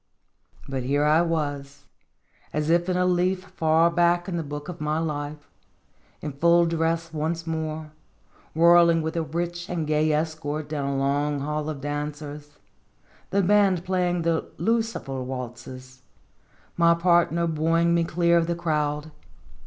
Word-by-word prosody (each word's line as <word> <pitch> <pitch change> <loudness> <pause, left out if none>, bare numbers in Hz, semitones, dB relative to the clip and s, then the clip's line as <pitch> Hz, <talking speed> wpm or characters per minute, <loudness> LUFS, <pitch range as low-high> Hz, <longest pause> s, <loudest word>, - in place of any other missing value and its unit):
But 135 -1 -3
here 140 +4 +1
I 155 +2 +4
was, 145 -4 -3 0.7
as 150 +1 0
if 175 +2 +2
in 180 - +1
a 180 - +2
leaf 180 +1 +1
far 160 +1 +3
back 175 0 +2
in 185 - -3
the 170 - -1
book 145 -1 -7
of 175 -3 -7
my 150 +1 0
life, 150 -2 -4 0.7
in 150 - -4
full 170 +4 +4
dress 165 0 -1
once 160 +2 -2
more, 160 -1 -4 0.6
whirling 170 0 +5
with 160 +1 -3
a 165 - +1
rich 175 +2 -4
and 170 -3 -2
gay 155 +1 +1
escort 155 -1 -2
down 145 -2 -3
a 140 - -1
long 140 +1 0
hall 150 +1 -2
of 145 -3 -5
dancers, 145 0 -6 0.7
the 200 0 +1
band 195 -2 +3
playing 180 -2 0
the 165 -1 0
" - - -30
Lucifer" 225 - -2
waltzes, 130 0 -8 0.7
my 170 0 +4
partner 170 -1 +2
buoying 165 +1 +1
me 170 0 +3
clear 170 +1 +2
of 165 - -1
the 170 - -1
crowd. 150 -2 -2
160 Hz, 155 wpm, -25 LUFS, 145-170 Hz, 0.7 s, whirling